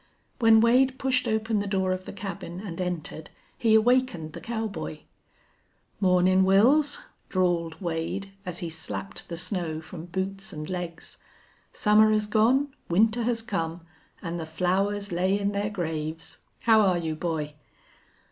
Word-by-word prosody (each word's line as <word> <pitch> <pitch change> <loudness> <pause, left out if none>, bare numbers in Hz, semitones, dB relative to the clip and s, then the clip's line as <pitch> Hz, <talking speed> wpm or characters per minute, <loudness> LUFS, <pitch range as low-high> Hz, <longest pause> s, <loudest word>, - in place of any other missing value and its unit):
When 225 -2 +6
Wade 255 +3 +4
pushed 260 -2 +1
open 220 0 0
the 200 - -2
door 190 -1 0
of 185 0 -3
the - - -6
cabin 195 -3 -6
and 185 -3 -5
entered 170 -3 -4 0.3
he 225 -2 +3
awakened 220 -9 +2
the - - -8
cowboy. 215 -10 -4 1.0
"Mornin', 185 -1 +4
Wils," 275 - +4 0.3
drawled 170 -3 0
Wade, 175 +3 -3
as 180 -1 -5
he - - -3
slapped 100 -12 -5
the 170 - -4
snow 170 -3 -2
from 160 +1 -9
boots 190 +2 -4
and 155 -1 -6
legs. 175 -2 -6 0.5
"Summer 215 0 +4
has 215 0 +2
gone, 245 +7 +2 0.2
winter 220 +7 +3
has 230 -2 0
come, 165 -6 -3 0.4
an' 170 -1 -3
the 160 -2 -5
flowers 195 +5 0
lay 185 +3 +1
in 200 0 0
their 205 +1 -1
graves! 160 -4 -4 0.2
How 220 -1 +5
are 185 -4 +3
you, 165 -2 -2
boy?" 155 -2 -3
190 Hz, 145 wpm, -27 LUFS, 170-220 Hz, 1.0 s, When